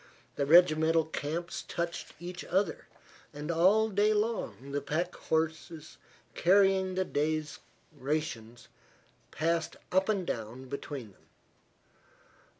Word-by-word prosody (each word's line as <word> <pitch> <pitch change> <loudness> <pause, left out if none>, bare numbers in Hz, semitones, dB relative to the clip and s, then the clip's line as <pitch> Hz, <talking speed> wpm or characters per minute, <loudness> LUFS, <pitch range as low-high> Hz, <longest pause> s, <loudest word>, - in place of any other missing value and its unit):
The 140 - -1
regimental 160 -1 +5
camps 160 +2 -4
touched 170 0 -4
each 175 +1 -7
other, 190 -1 -1 0.5
and 150 +3 -3
all 190 +7 +4
day 210 +1 +2
long 210 - -2
the 145 0 -1
pack 170 +5 -1 0.2
trains 160 0 -2 0.3
carrying 190 0 +3
the 185 0 +1
day's 155 -1 -1 0.4
rations 130 -5 -4 0.6
passed 165 +1 -1 0.2
up 190 +3 +2
and 195 -4 +1
down 115 0 -5
between 140 -5 -6
them. 95 - -27
165 Hz, 110 wpm, -30 LUFS, 145-185 Hz, 0.6 s, regimental